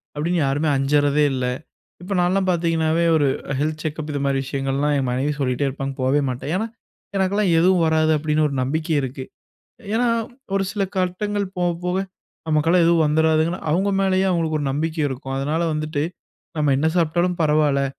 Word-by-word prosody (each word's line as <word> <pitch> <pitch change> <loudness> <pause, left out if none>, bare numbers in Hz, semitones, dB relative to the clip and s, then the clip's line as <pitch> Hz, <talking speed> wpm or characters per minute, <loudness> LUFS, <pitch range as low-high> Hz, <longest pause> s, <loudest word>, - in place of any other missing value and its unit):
அப்படீன்னு 170 +4 0
யாருமே 145 +3 0
அஞ்சறதே 145 +2 +2
இல்லை. 125 -1 -1 0.5
இப்ப 195 +3 -4
நான்லாம் 185 +2 +1
பார்த்தீங்கன்னாவே, 165 -1 +1
ஒரு 145 -3 +3 0.3
'ஹெல்த் 155 +1 -2
செக்கப்' 155 0 -4
இது 145 - -2
மாரி 135 -1 +1
விஷயங்கள்லாம் 135 +2 -1
என் 130 -2 -1
மனைவி 130 +4 0
சொல்லிட்டே 130 +1 0
இருப்பாங்க, 135 0 -4
போவே 135 +3 +2
மாட்டேன். 125 +3 -5
ஏன்னா, 220 +4 -1 0.5
"எனக்கெல்லாம் 195 0 +1
எதுவும் 180 0 +4
வராது" 160 0 +3
அப்படீன்னு 155 0 +1
ஒரு 140 - -4
நம்பிக்கையிருக்கு. 140 -2 -2 0.7
ஏன்னா 240 +2 +2 0.5
ஒரு 195 - +2
சில 205 -2 -1
கட்டங்கள் 200 +3 -1
போவ 175 0 +1 0.2
போவ 180 0 0 0.5
நமக்கெல்லாம் 165 +3 +3
எதுவும் 170 -1 +4
வந்துராதுன்னு, 160 +3 +2
அவங்க 190 +5 +1
மேலயே 190 0 +2
அவங்களுக்கு 165 -3 0
ஒரு 145 - -2
நம்பிக்கை 155 +3 -2
இருக்கும். 135 0 -6
அதனால 150 +5 -1
வந்துட்டு, 155 -1 -2 0.5
நம்ம 150 -2 +2
என்ன 155 +3 +1
சாப்பிட்டாலும் 175 +1 +1
பரவால்லை, 150 -3 +2
155 Hz, 155 wpm, -22 LUFS, 145-175 Hz, 0.7 s, எதுவும்